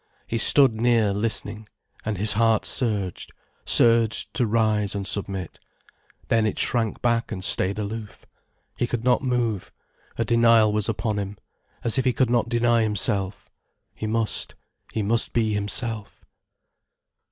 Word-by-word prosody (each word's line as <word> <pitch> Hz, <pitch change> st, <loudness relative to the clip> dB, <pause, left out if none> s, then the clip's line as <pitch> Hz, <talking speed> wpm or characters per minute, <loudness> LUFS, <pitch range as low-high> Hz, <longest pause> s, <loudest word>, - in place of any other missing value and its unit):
He 115 Hz, -, -3 dB
stood 125 Hz, -6 st, +4 dB
near, 115 Hz, -4 st, +3 dB
listening, 105 Hz, 0 st, -3 dB, 0.4 s
and 105 Hz, -2 st, -3 dB
his 105 Hz, +3 st, +2 dB
heart 115 Hz, 0 st, +2 dB
surged, 105 Hz, -8 st, -1 dB, 0.3 s
surged 115 Hz, -2 st, +3 dB
to 125 Hz, -4 st, 0 dB
rise 105 Hz, -3 st, +1 dB
and 100 Hz, -1 st, -3 dB
submit. 95 Hz, -3 st, -4 dB, 0.7 s
Then 115 Hz, -1 st, +2 dB
it -, -, -3 dB
shrank 115 Hz, -3 st, -1 dB
back 115 Hz, -1 st, 0 dB
and 95 Hz, -4 st, -5 dB
stayed 95 Hz, +1 st, -1 dB
aloof. 105 Hz, 0 st, -6 dB, 0.5 s
He 120 Hz, -, +1 dB
could 120 Hz, -1 st, -3 dB
not 125 Hz, 0 st, +3 dB
move, 120 Hz, -7 st, -1 dB, 0.5 s
a 115 Hz, -, 0 dB
denial 115 Hz, -2 st, +4 dB
was 105 Hz, +1 st, 0 dB
upon 110 Hz, -1 st, -2 dB
him, 100 Hz, 0 st, -5 dB, 0.5 s
as 120 Hz, +3 st, +1 dB
if 130 Hz, -, -1 dB
he 130 Hz, -, +2 dB
could 125 Hz, -2 st, +1 dB
not 120 Hz, -1 st, +1 dB
deny 120 Hz, -1 st, +2 dB
himself. 100 Hz, -2 st, -2 dB, 0.5 s
He 110 Hz, -, -5 dB
must, 110 Hz, 0 st, 0 dB, 0.4 s
he 110 Hz, -, -2 dB
must 115 Hz, +3 st, +1 dB
be 110 Hz, -2 st, +1 dB
himself. 105 Hz, +1 st, -2 dB
110 Hz, 145 wpm, -24 LUFS, 105-115 Hz, 0.7 s, stood